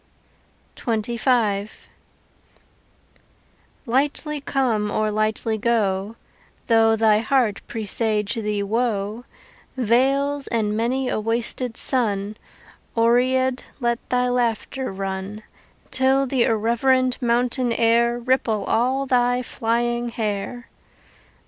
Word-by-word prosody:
XXV 225 Hz, -2 st, -1 dB, 2.0 s
Lightly 290 Hz, +4 st, -1 dB
come 240 Hz, -7 st, 0 dB
or 215 Hz, +1 st, 0 dB
lightly 215 Hz, +1 st, -1 dB
go: 210 Hz, -2 st, 0 dB, 0.5 s
Though 225 Hz, -1 st, +4 dB
thy 220 Hz, -1 st, +4 dB
heart 230 Hz, -3 st, +1 dB
presage 215 Hz, -1 st, -1 dB
thee 210 Hz, -3 st, -2 dB
woe, 220 Hz, +1 st, -2 dB, 0.5 s
Vales 270 Hz, +4 st, +1 dB
and 215 Hz, -3 st, 0 dB
many 250 Hz, +4 st, 0 dB
a -, -, -1 dB
wasted 230 Hz, +2 st, -2 dB
sun, 210 Hz, -5 st, 0 dB, 0.6 s
Oread 255 Hz, +2 st, +2 dB, 0.2 s
let 235 Hz, -2 st, 0 dB
thy 250 Hz, 0 st, +1 dB
laughter 245 Hz, +1 st, -1 dB
run, 195 Hz, +2 st, -5 dB, 0.5 s
Till 265 Hz, +1 st, +3 dB
the 255 Hz, -2 st, +1 dB
irreverent 250 Hz, +4 st, +1 dB
mountain 245 Hz, +1 st, +1 dB
air 235 Hz, +1 st, +3 dB
Ripple 240 Hz, -3 st, 0 dB
all 260 Hz, +4 st, +1 dB
thy 245 Hz, -1 st, +2 dB
flying 240 Hz, +1 st, -1 dB
hair. 225 Hz, +2 st, -3 dB
235 Hz, 90 wpm, -22 LUFS, 215-250 Hz, 2.0 s, Though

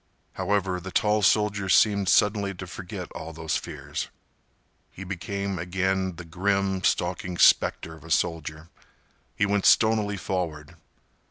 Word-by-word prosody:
However, 95 Hz, -3 st, -1 dB
the 95 Hz, +2 st, -8 dB
tall 105 Hz, +3 st, +2 dB
soldier 100 Hz, 0 st, +2 dB
seemed 100 Hz, 0 st, +4 dB
suddenly 100 Hz, -2 st, +2 dB
to 95 Hz, -, -7 dB
forget 90 Hz, 0 st, -8 dB
all 80 Hz, -, -8 dB
those 80 Hz, -1 st, -3 dB
fears. -, -, -5 dB, 0.8 s
He 95 Hz, -, -10 dB
became 100 Hz, 0 st, -4 dB
again 95 Hz, +1 st, -1 dB
the 85 Hz, +1 st, -9 dB
grim, 95 Hz, +2 st, 0 dB
stalking 90 Hz, +1 st, -1 dB
specter 80 Hz, -, +4 dB
of 80 Hz, -, -14 dB
a 80 Hz, -, -12 dB
soldier. 80 Hz, +1 st, -1 dB, 0.7 s
He 105 Hz, -, +2 dB
went 100 Hz, -1 st, +1 dB
stonily 110 Hz, -2 st, +3 dB
forward. 85 Hz, -4 st, -4 dB
95 Hz, 135 wpm, -26 LUFS, 85-100 Hz, 0.8 s, seemed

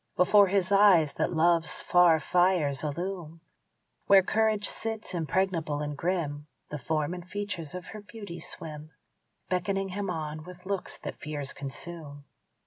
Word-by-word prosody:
Before 200 Hz, +2 st, +6 dB
his 190 Hz, 0 st, +1 dB
eyes 195 Hz, -7 st, +6 dB
that -, -, 0 dB
love's 165 Hz, 0 st, +2 dB
far 175 Hz, -2 st, +5 dB
fires 175 Hz, -6 st, +2 dB
illume 170 Hz, +1 st, -4 dB, 0.7 s
Where 195 Hz, -1 st, +7 dB
courage 215 Hz, +1 st, +1 dB
sits, 225 Hz, -3 st, -4 dB
impregnable 165 Hz, -2 st, 0 dB
and 145 Hz, 0 st, -4 dB
grim 150 Hz, -3 st, -2 dB, 0.2 s
The 150 Hz, -, -4 dB
form 155 Hz, +4 st, -1 dB
and 180 Hz, -1 st, -6 dB
features 185 Hz, -5 st, -5 dB
of 180 Hz, -2 st, -6 dB
her 215 Hz, -, -9 dB
beauty 205 Hz, -5 st, -9 dB
swim, 155 Hz, -1 st, -8 dB, 0.6 s
Beckoning 195 Hz, +2 st, 0 dB
him 200 Hz, +1 st, -3 dB
on 155 Hz, -2 st, -4 dB
with 180 Hz, +1 st, -12 dB
looks 195 Hz, -1 st, -3 dB
that -, -, -6 dB
fears 145 Hz, -2 st, -4 dB
consume. 145 Hz, 0 st, -7 dB
175 Hz, 140 wpm, -28 LUFS, 155-195 Hz, 0.7 s, Where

